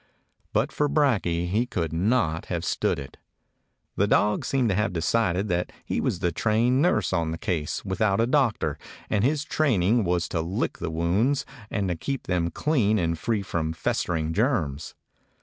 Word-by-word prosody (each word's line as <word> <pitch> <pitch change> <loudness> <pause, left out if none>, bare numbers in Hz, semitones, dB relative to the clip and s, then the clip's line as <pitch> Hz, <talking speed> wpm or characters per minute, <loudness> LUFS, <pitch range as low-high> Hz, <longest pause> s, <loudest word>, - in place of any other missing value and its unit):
But - - +1
for 150 0 0
Brakje 100 - +1
he 110 +6 +1
could 85 -9 -2
not 85 -3 +1
have - - -3
stood - - 0
it. 70 -2 -9 0.8
The 100 - +2
dog 105 0 +2
seemed 130 -4 +1
to 95 - +1
have 105 -1 0
decided 90 +2 +1
that 90 0 -1
he - - -1
was - - 0
the 90 -2 +1
trained 115 - +2
nurse 105 - +2
on 85 -3 +1
this 80 +1 -4
case 80 -1 -2
without 100 +1 +1
a 115 - +4
doctor 130 -3 +1 0.3
and 105 -2 +2
his 145 +3 +1
training 120 - +2
was 85 -1 0
to 80 - -1
lick 85 +4 -2
the - - -3
wounds 90 - +1 0.2
and 95 -5 -2
keep 135 +8 -3
them 90 -2 0
clean 110 - +1
and 85 -3 0
free 105 +5 -1
from 80 -4 -2
festering 80 0 -1
germs. 80 - -1
95 Hz, 170 wpm, -26 LUFS, 85-115 Hz, 0.8 s, a